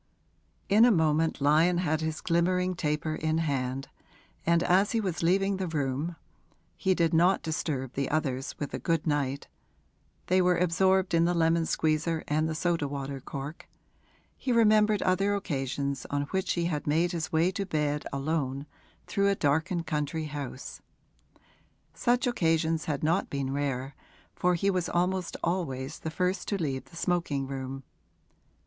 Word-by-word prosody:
In 210 +3 +5
a 245 - +7
moment 160 -5 +2
Lyon 160 +5 +4
had 160 -3 0
his 160 0 -3
glimmering 180 +2 +1
taper 155 -2 -1
in 155 0 -1
hand, 135 -4 -1 0.6
and 170 0 +4
as 190 +5 +3
he 230 - +2
was 185 -6 -2
leaving 195 +3 +2
the 190 -1 -2
room 150 +1 -2 0.6
(he 190 -2 +1
did 165 -2 +1
not 175 +4 +4
disturb 150 -5 -2
the 140 0 -1
others 140 -3 -1
with 145 - -5
a - - -2
good 165 -2 0
night; 140 -3 -1 0.8
they 185 +1 +3
were 180 -1 +3
absorbed 185 +2 +2
in 165 0 +4
the 175 +1 +1
lemon 165 0 +2
squeezer 160 +1 0
and 155 +2 +1
the 160 - -3
soda 165 -2 0
water 140 -1 -5
cork) 140 +3 -7 0.7
he 260 - -3
remembered 215 -2 +4
other 195 +2 +2
occasions 140 -6 -3
on 145 0 0
which 190 0 0
he 170 -1 -1
had 150 -4 -2
made 165 +4 +2
his 165 -3 -3
way 165 +3 +3
to 195 - -2
bed 150 -5 -1
alone 140 -1 -2 0.4
through 200 0 +1
a 200 - +2
darkened 160 +3 0
country 150 +1 -2
house; 145 -3 -6 1.1
such 245 +2 +1
occasions 165 -8 +1
had 150 -2 -2
not 165 +5 +1
been 135 -1 -2
rare, 135 -1 -2 0.4
for 180 0 +1
he 195 +4 +1
was 180 -2 -1
almost 180 +1 0
always 155 -5 -2
the 160 - -4
first 180 +4 -1
to 200 - 0
leave 135 -6 -2
the 135 - -17
smoking 170 -6 -1
room. 135 0 -5
160 Hz, 160 wpm, -28 LUFS, 145-180 Hz, 1.1 s, a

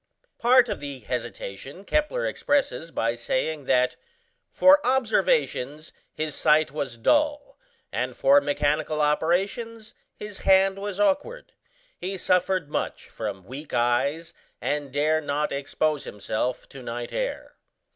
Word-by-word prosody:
Part 250 +1 +5
of - - -3
the 140 -2 -6
hesitation 120 - -6
Kepler 305 - 0
expresses 280 - 0
by 115 -7 0
saying 130 +5 -2
that 125 -1 +2 0.5
"for 290 +1 +6
observations 225 - +1 0.2
his 155 -1 -3
sight 150 0 +3
was 140 -5 -4
dull, 295 - +1 0.3
and - - -2
for 285 +1 +5
mechanical 150 - 0
operations 195 +9 0 0.2
his 210 -2 -8
hand 195 0 +4
was 200 -1 -5
awkward. 335 - 0 0.4
He 190 +2 -4
suffered 180 -2 +1
much 150 - -4
from 100 -4 -5
weak 140 +7 -7
eyes, 140 +8 +1 0.3
and 145 -2 -2
dare 155 +3 +2
not 150 0 -1
expose 145 +1 -1
himself 110 +4 -3
to 135 - -10
night 120 0 -5
air." - - -4
155 Hz, 125 wpm, -25 LUFS, 135-215 Hz, 0.5 s, for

